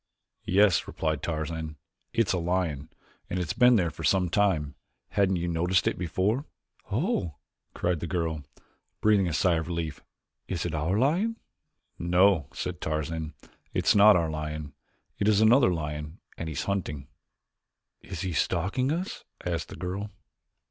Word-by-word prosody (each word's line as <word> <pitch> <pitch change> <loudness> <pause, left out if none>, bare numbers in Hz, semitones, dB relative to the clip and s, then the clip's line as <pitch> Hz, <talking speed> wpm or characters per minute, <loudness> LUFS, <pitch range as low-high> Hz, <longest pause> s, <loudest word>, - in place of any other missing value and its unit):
"Yes," 100 -2 +4
replied 80 -3 -2
Tarzan, 80 -1 -3 0.4
"it 115 -1 +2
is - - +1
a 90 - 0
lion. 85 -5 -1 0.4
It 90 - -2
has 90 -4 -1
been 125 0 +6
there 85 -6 +2
for - - -9
some 95 -2 +3
time. 85 -7 +1 0.4
Hadn't 95 -1 +2
you 85 0 -1
noticed 85 +2 +1
it - - +1
before?" 95 - 0 0.5
"Oh!" 110 - 0 0.4
cried 90 -2 0
the 85 - -4
girl, 80 -2 -2 0.6
breathing 105 -3 +4
a 85 - -2
sigh 85 +1 +3
of 80 - -3
relief, 85 -3 -3 0.5
"is 90 -3 -2
it 85 - -2
our 80 +6 0
lion?" 175 - +2 0.6
"No," 90 -2 +4
said 90 -2 -5
Tarzan, 80 +1 -3 0.4
"it - - 0
is - - +5
not 105 +1 +8
our 85 -2 +1
lion; 75 -1 -5 0.5
it 100 - +1
is 105 -1 +5
another 115 0 +6
lion 75 -1 -4 0.2
and 80 - -5
he - - -4
is - - -2
hunting." 75 -9 -3 0.9
"He - - -19 0.2
is 80 - 0
stalking 105 - 0
us?" 175 +4 -3 0.2
asked 85 -5 -2
the - - -8
girl. 95 +4 -4
85 Hz, 160 wpm, -28 LUFS, 80-100 Hz, 0.9 s, not